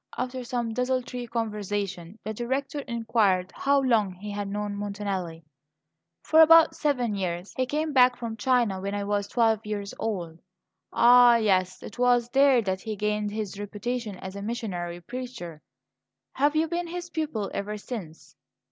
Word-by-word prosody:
After 255 0 -3
some 240 -2 -2
desultory 250 0 -2
conversation, 205 -5 -3
the 215 - -4
Director 265 +6 -2
inquired 220 -7 0
how 280 0 +2
long 225 -7 +2
he 205 +3 -7
had 205 0 -3
known 205 0 -3
Montanelli. 200 -5 -4 0.8
"For 320 0 +5
about 325 0 +7
seven 260 -8 0
years. 180 -1 -3
He 255 0 0
came 305 +2 -1
back 250 -2 +6
from 230 -2 -5
China 225 -4 +1
when 200 +1 -3
I 205 - -2
was 205 0 -1
twelve 225 -2 +2
years 205 -1 -4
old." 175 -7 -3 0.5
"Ah, 245 0 +7
yes! 190 -5 +1
It 215 - -10
was 245 -1 +3
there 270 -2 +4
that 190 -1 -2
he 220 -1 -4
gained 210 0 -1
his 205 -2 -5
reputation 210 +1 -4
as 190 +1 -8
a 200 - -6
missionary 190 -6 -4
preacher. 235 -9 -7 0.7
Have 290 +2 +2
you 315 +1 +2
been 345 +1 -2
his 350 0 -6
pupil 295 -12 -3
ever 210 +1 -3
since?" 200 -8 -8
220 Hz, 155 wpm, -26 LUFS, 200-250 Hz, 0.8 s, about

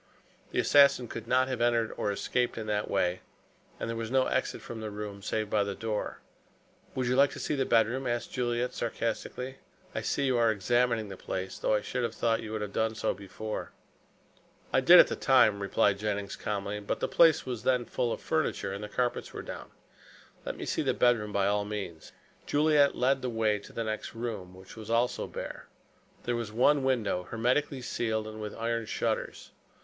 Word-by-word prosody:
The - - -5
assassin 140 -3 +5
could 115 0 -7
not 130 +1 +3
have 130 -2 -3
entered 120 -2 +2
or 105 - -1
escaped 120 +5 -1
in 110 - -4
that 105 -1 -1
way, 90 -2 +1 0.6
and - - -3
there 115 - -3
was 115 -1 -4
no 130 +1 +3
exit 130 - -1
from 115 -2 -8
the 110 - -4
room 105 -1 -6
save 110 +1 -2
by 105 0 +2
the 100 -1 -4
door. 110 -2 -3 0.7
"Would 130 - 0
you 125 +1 +1
like 140 +1 +5
to - - -7
see - - -2
the 135 -2 0
bedroom?" 120 +3 +2
asked 120 0 -2
Juliet 120 0 -1
sarcastically. 120 +3 -3 0.4
"I - - -2
see 140 - 0
you 130 -3 +2
are 115 -1 +4
examining 115 +1 +1
the 95 - -8
place, 95 +1 -5
though - - +2
I 105 - +1
should 125 - -2
have 120 - -2
thought 115 -1 +1
you 110 - -7
would 110 -1 -2
have 100 -1 -6
done 110 0 0
so - - 0
before." 105 +2 -6 1.0
"I - - +4
did - - +9
at - - +10
the - - -3
time," 100 -2 +4
replied 100 0 +2
Jennings 100 -2 -2
calmly, 105 0 -3
"but 100 - -3
the - - 0
place 165 -2 +5
was 125 -4 -4
then 125 +1 +2
full 120 0 -1
of - - -3
furniture - - -1
and 100 +1 -6
the 105 - -6
carpets 125 +2 -2
were - - -6
down. - - -8 0.8
Let - - -3
me - - -5
see - - -1
the - - 0
bedroom 115 -4 +2
by 100 -1 +1
all 105 +1 +2
means." 100 -6 -6 0.4
Juliet 145 -1 +4
led 130 +2 +2
the 125 - -2
way 110 -2 +1
into 100 - -12
the 115 - -3
next 110 +1 -4
room, 105 -6 -5
which 95 0 -13
was 110 -1 -9
also 120 +2 +1
bare. - - -7 0.6
There 120 - -1
was 115 -2 -3
one 135 +5 +3
window 110 -9 0
hermetically 130 +4 0
sealed 110 -3 -1
and 110 0 -7
with 105 -1 -5
iron 115 -1 -1
shutters. - - -2
115 Hz, 205 wpm, -29 LUFS, 105-125 Hz, 1.0 s, at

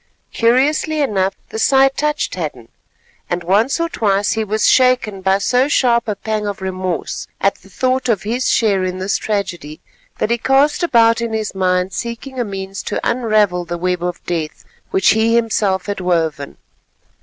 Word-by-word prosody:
Curiously 280 +6 +2
enough, 195 -9 0
the 220 - -5
sight 270 +2 +4
touched 300 0 -1
Hadden, 145 -10 -5 0.6
and 175 0 -2
once 210 - +2
or 335 - +1
twice 205 - 0
he 220 - 0
was 215 +1 0
shaken 250 -6 +3
by 190 +1 +2
so 250 +6 +2
sharp 240 -5 +2
a 210 - -1
pang 215 +1 -3
of 200 -1 -4
remorse 185 -2 -4
at 195 - +2
the 195 - -18
thought 255 +5 -1
of 210 -5 +1
his 240 +4 -1
share 200 -4 +2
in 185 0 -2
this 190 +1 -1
tragedy, 185 -8 -4 0.4
that 220 - -1
he 235 - +1
cast 275 +7 +2
about 230 -8 +3
in 230 -1 -3
his 220 -2 -2
mind 185 0 0
seeking 240 +3 -5
a - - +1
means 195 -2 -6
to - - -3
unravel 215 -7 +1
the 175 0 -5
web 180 0 -1
of 175 0 -4
death 160 -3 -4 0.2
which 190 - +3
he 225 +1 +3
himself 210 -5 +1
had 205 -1 -3
woven. 165 -6 -1
210 Hz, 175 wpm, -18 LUFS, 185-235 Hz, 0.6 s, sight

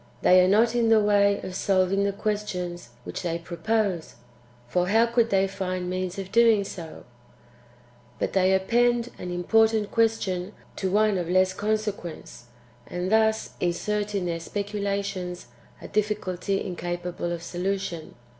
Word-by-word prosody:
They 185 0 +7
are - - +3
not 225 +4 +4
in 235 -2 +2
the 225 -1 +6
way 200 -1 +3
of 185 - -6
solving 195 +1 +1
the 200 - +1
questions 185 - -3
[which - - -6
they 170 -2 -2
propose]; 180 +1 -2 0.5
for 180 +8 0
how 225 +4 +4
could 235 0 +2
they 195 -1 +3
find 185 -2 -3
means 185 0 -3
of 195 -1 -6
doing 230 -3 +5
so? 170 -4 -8 1.1
But - - -2
they 190 -1 +3
append 240 +4 +2
an 180 - -5
important 220 +4 +2
question 205 -4 0 0.2
to 190 - -1
one 210 0 +2
of 170 -1 -4
less 185 +1 +3
consequence, 205 - -4 0.4
and 180 +2 -3
thus 220 0 +2
insert 205 +4 -1
[in 190 -2 -1
their 170 -1 -2
specula 200 +2 -2
tions] 180 -3 -5 0.3
a - - -9
difficulty 200 -2 -1
incapable 175 -1 -4
of 170 -1 -4
solution. 180 -1 -3
195 Hz, 145 wpm, -26 LUFS, 180-210 Hz, 1.1 s, They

